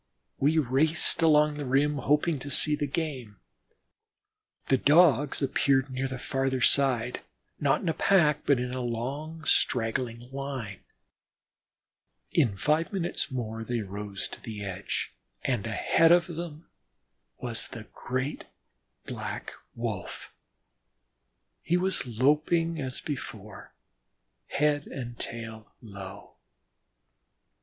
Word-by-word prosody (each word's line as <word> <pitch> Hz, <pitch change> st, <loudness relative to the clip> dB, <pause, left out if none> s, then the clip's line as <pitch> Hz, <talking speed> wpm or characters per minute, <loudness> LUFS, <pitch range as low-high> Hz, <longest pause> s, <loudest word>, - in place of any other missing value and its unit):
We 150 Hz, +4 st, +3 dB
raced 155 Hz, +5 st, +3 dB
along 150 Hz, -2 st, +4 dB
the 145 Hz, -, -4 dB
rim, 145 Hz, +3 st, +2 dB
hoping 150 Hz, +2 st, +2 dB
to 140 Hz, -, -7 dB
see 150 Hz, +2 st, +4 dB
the 145 Hz, 0 st, -2 dB
game. 135 Hz, -, -4 dB, 1.3 s
The 135 Hz, -, +5 dB
Dogs 145 Hz, -2 st, +4 dB
appeared 135 Hz, 0 st, +2 dB
near 130 Hz, +1 st, -1 dB
the 130 Hz, 0 st, -5 dB
farther 135 Hz, +1 st, -1 dB
side, 125 Hz, -2 st, +3 dB, 0.4 s
not 140 Hz, -2 st, +2 dB
in -, -, -4 dB
a -, -, +1 dB
pack, 155 Hz, -7 st, +3 dB
but 140 Hz, -, +5 dB
a 125 Hz, +1 st, -3 dB
long, 140 Hz, +7 st, -4 dB
straggling 115 Hz, -2 st, +1 dB
line. 135 Hz, -8 st, -5 dB, 1.5 s
In 120 Hz, -11 st, +2 dB
five 155 Hz, +8 st, +1 dB
minutes 180 Hz, -6 st, -1 dB
more 115 Hz, -4 st, -4 dB
they 120 Hz, 0 st, -2 dB
rose 100 Hz, 0 st, -5 dB
to -, -, -10 dB
the 105 Hz, -3 st, -6 dB
edge, 95 Hz, -6 st, -3 dB, 0.3 s
and 120 Hz, -5 st, -1 dB
ahead 160 Hz, +9 st, +3 dB
of 175 Hz, 0 st, +6 dB
them 170 Hz, -2 st, -7 dB, 0.7 s
was -, -, -3 dB
the -, -, -8 dB
great 130 Hz, +4 st, -3 dB, 0.6 s
Black -, -, -5 dB, 0.2 s
Wolf. 110 Hz, -6 st, -5 dB, 1.3 s
He 175 Hz, -, +1 dB
was 185 Hz, -6 st, 0 dB
loping 150 Hz, +7 st, +2 dB
as 130 Hz, -1 st, -4 dB
before, 110 Hz, -, -7 dB, 0.7 s
head 145 Hz, 0 st, +1 dB
and 120 Hz, -3 st, -7 dB
tail 115 Hz, -2 st, -7 dB
low. 100 Hz, -4 st, -10 dB
135 Hz, 115 wpm, -28 LUFS, 115-150 Hz, 1.5 s, of